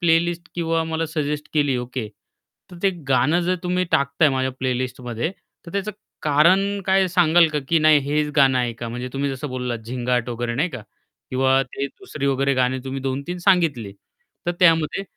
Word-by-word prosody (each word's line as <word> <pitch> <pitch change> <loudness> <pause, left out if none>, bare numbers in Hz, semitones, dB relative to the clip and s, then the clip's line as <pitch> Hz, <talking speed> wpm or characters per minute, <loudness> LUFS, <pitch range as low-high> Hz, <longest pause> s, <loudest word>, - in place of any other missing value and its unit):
Playlist 170 0 +1
किंवा 165 -1 0
मला 160 0 -2
suggest 150 -1 -2
केली, 145 -4 +2
ओके. 125 -2 -4 0.6
तर 180 - -11
ते 195 - +4 0.2
गाणं 135 +6 +3
जर 180 +2 +1
तुम्ही 180 +1 0
टाकता 140 +3 +2
आहे 150 - +4
माझ्या 130 0 0
प्लेलिस्टमध्ये, 125 +1 -2 0.4
तर 170 - -9
त्याचं 200 +1 -2 0.3
कारण 185 +7 +3
काय 190 0 +4
सांगाल 175 -1 +5
का, 150 - +1
की 165 -1 +4
नाही 155 -1 +6
हेच 150 0 +1
गाणं 135 -3 +5
ऐका 120 -1 -3
म्हणजे 125 +2 -5
तुम्ही 140 +1 -1
जसं 135 +2 -5
बोललात 125 -2 -3
झिंगाट 125 0 -1
वगैरे 120 0 -3
नाही 150 +9 +1
का? 125 -6 -7 0.5
किंवा 130 +1 +3
ते 140 +1 -4
दुसरी 155 - -6
वगैरे 140 0 +1
गाणी 130 0 +1
तुम्ही 135 0 -4
2-3 140 +7 -3
सांगितली, 165 - +2 0.5
तर 175 - +1
त्यामध्ये 165 +1 +3
145 Hz, 175 wpm, -22 LUFS, 130-170 Hz, 0.6 s, नाही